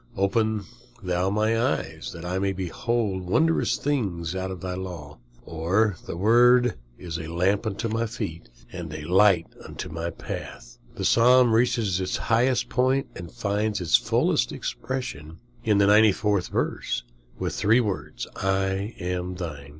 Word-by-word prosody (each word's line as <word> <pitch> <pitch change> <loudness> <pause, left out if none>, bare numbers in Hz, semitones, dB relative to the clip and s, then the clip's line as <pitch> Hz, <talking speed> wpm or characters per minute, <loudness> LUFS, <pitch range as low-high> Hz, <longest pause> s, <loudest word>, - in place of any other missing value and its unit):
"Open 110 +2 +1 0.4
thou 90 +1 0
mine 110 +2 +1
eyes, 95 -9 -2
that 85 +1 -9
I 90 +2 -1
may 100 0 0
behold 95 +2 -2
wondrous 120 - +2
things 95 - -2
out 95 0 -3
of 95 -1 -6
thy 90 +1 -3
law." 85 -7 -7 0.3
"Thy 90 +4 0
word 120 +5 +5 0.2
is 85 -2 -5
a 80 - -6
lamp 95 +6 +1
unto 110 +2 -2
my 115 +1 -1
feet, 85 - -6 0.2
and 85 -4 -6
a 75 - -6
light 90 +1 +4 0.2
unto - - -7
my 85 +1 -3
path." - - -8 0.2
The - - -3
Psalm 125 0 +5
reaches 115 -5 +2
its 95 - -1
highest 120 +2 +1
point, 130 +2 +1
and 85 -2 -8
finds 105 -2 -1
its 90 -3 +3
fullest - - +2
expression 85 - -5 0.3
in 105 -2 +3
the 100 - +5
94th 105 -2 +4
verse, - - -2 0.5
three 110 +4 +3
words, 105 -6 -3
"I 95 +2 -1
am 90 +1 -3
thine." 75 -6 -6
95 Hz, 145 wpm, -25 LUFS, 90-115 Hz, 0.5 s, word